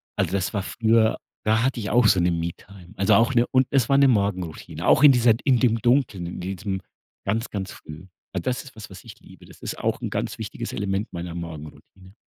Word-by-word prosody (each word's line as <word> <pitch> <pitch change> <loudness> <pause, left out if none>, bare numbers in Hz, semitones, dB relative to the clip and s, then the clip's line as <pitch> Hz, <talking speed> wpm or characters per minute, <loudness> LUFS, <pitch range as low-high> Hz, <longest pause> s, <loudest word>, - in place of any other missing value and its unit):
Also, - - 0
das 100 +2 -1
war 100 -2 -1
früher 110 0 +2 0.3
da 110 +1 +3
hatte 125 -1 0
ich 100 - -4
auch 120 -1 +4
so 95 -3 +4
'ne 90 0 +2
Me-Time, 85 +2 -6
also 100 +1 +3
auch 115 +4 +3
'ne 120 -1 +3
und 130 0 +3
es 135 -4 +1
war 135 - +4
'ne 140 -1 +6
Morgenroutine, 100 -8 -1
auch 145 - +5
in 145 - +10
dieser 120 -3 +4
in 130 -4 +3
dem 115 -3 +3
Dunkeln, 120 -7 +1
in 85 - -6
diesem 95 +1 -4 0.4
ganz, 110 +4 -1
ganz 95 -2 -5
früh. 80 +5 -11 0.3
Das 125 +5 -2
ist 135 - -14
was, 110 -1 -10
was 95 -2 -12
ich - - -13
liebe. - - -16
Das - - -17
ist - - -5
auch - - -1
'n - - -3
ganz - - -3
wichtiges - - -6
Element 100 +2 -2
meiner 85 0 -6
Morgenroutine. 85 +3 -10
100 Hz, 220 wpm, -24 LUFS, 90-120 Hz, 0.4 s, in